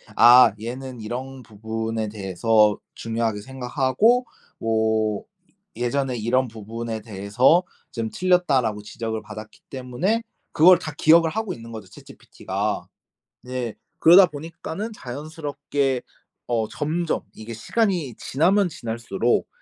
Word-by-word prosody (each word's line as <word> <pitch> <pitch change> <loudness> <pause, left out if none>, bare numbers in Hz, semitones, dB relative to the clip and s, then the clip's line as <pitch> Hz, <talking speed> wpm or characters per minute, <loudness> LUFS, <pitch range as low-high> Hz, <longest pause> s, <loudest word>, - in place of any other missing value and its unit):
아 120 0 +8
얘는 125 +1 -6
이런 130 +4 -6
부분에 110 0 -4
대해서 105 +1 +2 0.2
중요하게 115 -2 -2
생각하고 130 - +1 0.3
뭐 110 -1 0 0.5
예전에 130 +2 -1
이런 125 +3 +1
부분에 110 0 -6
대해서 110 - +2 0.3
좀 115 -3 -3
틀렸다라고 140 - +1
지적을 110 +1 -5
받았기 110 0 -10
때문에 135 - -1 0.3
그걸 180 +3 +7
다 155 - -7
기억을 160 +1 +5
하고 215 +1 -3
있는 115 0 -11
거죠 110 -1 -8
ChatGPT가. - - -5 0.6
네 125 -3 -4 0.2
그러다 180 +4 +8
보니까는 165 +6 -6
자연스럽게 145 - -3 0.5
어 115 -3 0
점점 160 +6 -2
이게 110 +2 -9
시간이 170 - -1
지나면 185 +8 +2
지날수록 115 - -1
125 Hz, 290 characters per minute, -23 LUFS, 110-155 Hz, 0.6 s, 아